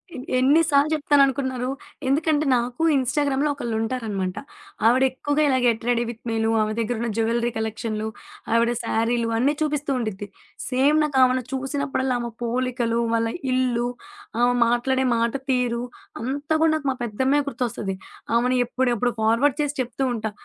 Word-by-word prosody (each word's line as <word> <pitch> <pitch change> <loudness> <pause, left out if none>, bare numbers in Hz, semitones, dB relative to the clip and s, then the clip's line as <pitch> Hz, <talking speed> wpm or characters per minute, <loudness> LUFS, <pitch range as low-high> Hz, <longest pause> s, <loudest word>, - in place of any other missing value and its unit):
ఎన్ 255 - -6
ఎన్ని 280 +6 +5
సార్లు 285 +1 +4
చెప్తానునుకున్నారు. 275 -4 +2 0.4
ఎందుకంటే, 305 +2 +2
నాకు 245 +5 -2
ఇన్స్‌టాగ్రామ్‌లో 280 +2 +1
ఒకళ్ళు 235 -5 -4
ఉంటారనమాట. 215 -6 -3 0.5
ఆవిడెక్కువగా 265 +4 +2
ఇలా 265 -2 +3
గేట్ 230 -1 +1
రెడి 240 0 +2
విత్ 235 0 -9
మీలు, 225 0 0
ఆమె 215 0 0
దగ్గర 230 +1 -1
ఉన్న 235 - -1
జ్యువెలరీ 235 +1 +1
కలెక్షన్లు, 220 0 -3 0.5
ఆవిడ 235 +1 +3
శారీలు 230 +1 0
అన్నీ 275 +5 +2
చూపిస్తూ 295 -1 -1
ఉండిద్ది. 210 -4 -4 0.4
సేమ్ 275 +4 +3
నాకు 285 -3 -1
ఆమెన 255 0 +3
చూసినప్పుడల్లా 270 -1 -1
ఆమె 235 -1 -4
పోలికలు, 240 -1 -1
వాళ్ళ 230 0 +1 0.2
ఇల్లు, 245 -2 +1 0.5
ఆమె 245 0 +4
మాట్లాడే 260 +3 +1
మాట 230 +1 +1 0.2
తీరు, 245 -1 0 0.4
అంతా 285 +5 -2
కూడా 320 -1 +4
నాకు 285 -3 -3
మా 260 - -4
పెద్దమ్మే 260 +6 +1
గుర్తొస్తది. 230 -7 -3 0.4
ఆమెని 250 +1 +2
ఎప్పుడు 255 +1 0
ఎప్పుడు 245 +1 0
ఫార్వర్డ్ 235 +6 +2
చేసి 290 -1 -1
చెప్తూ 255 +2 -3
ఉంటా. 220 -1 -3
250 Hz, 145 wpm, -23 LUFS, 230-275 Hz, 0.5 s, ఎన్ని